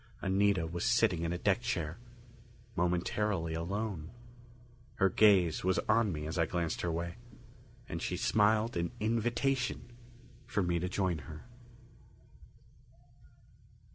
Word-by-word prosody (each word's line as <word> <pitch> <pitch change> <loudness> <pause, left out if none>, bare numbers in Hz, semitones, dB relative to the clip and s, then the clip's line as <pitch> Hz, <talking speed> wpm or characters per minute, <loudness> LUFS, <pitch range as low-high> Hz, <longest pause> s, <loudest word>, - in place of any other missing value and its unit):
Anita 95 -2 +2
was 85 +1 -4
sitting 85 - +3
in 85 0 -1
a 90 - -1
deck 100 +5 +1
chair, 90 -7 -3 0.8
momentarily 90 0 0
alone. 90 0 -3 0.9
Her 95 - +3
gaze 95 -6 +4
was 95 0 +2
on 110 -1 +3
me 75 -2 -4
as 80 +3 -3
I 85 - +3
glanced 85 -2 -2
her 85 - -1
way, 85 +4 -4 0.7
and - - -5
she - - -2
smiled 110 +2 +2
an 85 0 0
invitation 120 +3 0 0.6
for 100 - 0
me 85 -1 0
to 90 +2 -2
join 90 -3 0
her. 75 - -10
90 Hz, 125 wpm, -32 LUFS, 85-105 Hz, 0.9 s, gaze